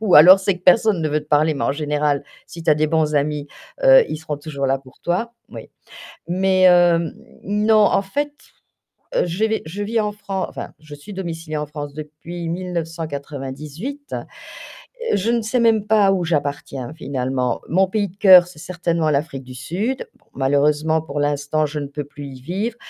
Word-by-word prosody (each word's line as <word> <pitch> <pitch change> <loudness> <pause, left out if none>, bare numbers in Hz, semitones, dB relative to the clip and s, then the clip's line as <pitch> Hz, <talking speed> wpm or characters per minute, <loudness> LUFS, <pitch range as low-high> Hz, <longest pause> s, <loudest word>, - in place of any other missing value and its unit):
ou 210 -5 +3
alors 180 +6 +10
c'est 190 -1 0
que 180 - -19
personne 200 0 +4
ne 155 - 0
veut 150 +1 0
te 150 - -16
parler 150 +1 +3
mais 140 - -2
en - - +1
général, 150 -1 0 0.2
si 165 - -10
tu 160 - +2
as 150 - +6
des 155 - +2
bons 155 -1 +1
amis, 145 0 -1 0.3
heu, - - +7
ils - - -4
seront 155 -1 -5
toujours 145 -2 -4
là 135 0 +1
pour 130 -1 -19
toi, 225 +7 -1 0.2
moui, - - -10 0.6
mais 185 +1 +2
hem, 175 -2 +5 0.3
non, 210 +2 +3
en 195 - +3
fait, 290 +9 -2 1.0
je 180 +6 -1
vai 220 0 0
je 195 +6 -5
vis 225 +2 0
en 210 - -1
Fran 195 -2 -4
enfin, - - -8
je 150 -1 -12
suis 145 +8 -11
domiciliée 165 -5 -5
en 150 - -3
France 145 -1 -7
depuis 155 +3 -7
1998. 165 - -5 1.0
Je 200 +4 +1
ne 235 - +2
sais 220 +4 0
même 225 -3 +3
pas 205 -3 +4
où 185 -2 0
j'appartiens 145 -4 -3
finalement, 130 -5 -2
mon 190 +4 +3
pays 205 +1 0
de 180 - -19
cœur, 185 -3 +8
c'est 180 -4 -14
certainement 170 -2 -1
l'Afrique 145 -1 -1
du 125 0 -11
Sud, 210 - -3
bon, - - -34
malheureusement, 150 +3 +2
pour 145 -2 -5
l'instant, 145 +1 0
je 150 +1 -5
ne 145 - -4
peux 145 +1 -5
plus 145 0 -10
y 130 -1 -11
vivre, 200 - -3
160 Hz, 190 wpm, -20 LUFS, 145-190 Hz, 1.0 s, alors